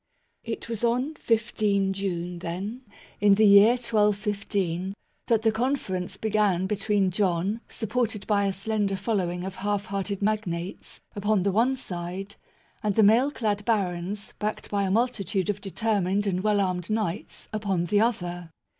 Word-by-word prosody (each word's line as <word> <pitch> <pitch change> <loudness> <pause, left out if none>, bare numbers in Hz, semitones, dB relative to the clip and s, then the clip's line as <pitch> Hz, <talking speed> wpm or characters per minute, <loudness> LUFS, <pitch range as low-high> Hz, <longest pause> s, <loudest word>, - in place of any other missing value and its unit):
It 230 0 -5
was 230 -1 -4
on 250 +6 +1
15 215 -6 +1
June, 180 -3 -3
then, 190 +8 -5 0.4
in 205 -1 +6
the 215 +2 +5
year 200 +3 +8
1215, 205 -5 0 0.3
that 225 -2 +2
the 225 - +4
conference 215 -6 -2
began 210 -4 +1
between 200 -1 +1
John, 195 +3 0
supported 220 -2 -2
by 200 -2 +2
a - - +1
slender 200 0 -1
following 180 -4 -1
of 190 0 -6
half 205 0 -1
hearted 200 0 -3
magnates, 190 -4 -3
upon 205 -1 +1
the 200 - +2
one 235 +7 +3
side, 185 -3 -6 0.5
and 210 -2 0
the 220 - +5
mail 230 +7 +5
clad 210 -7 -1
barons, 200 -2 -1
backed 215 0 -3
by 200 -1 +1
a - - -1
multitude 205 -3 +1
of 205 0 -8
determined 200 -1 0
and 185 -2 0
well 210 0 +2
armed 180 -1 -1
knights, 215 -3 -3
upon 200 -5 0
the 205 +4 +2
other. 175 -7 -1
205 Hz, 150 wpm, -26 LUFS, 190-220 Hz, 0.5 s, year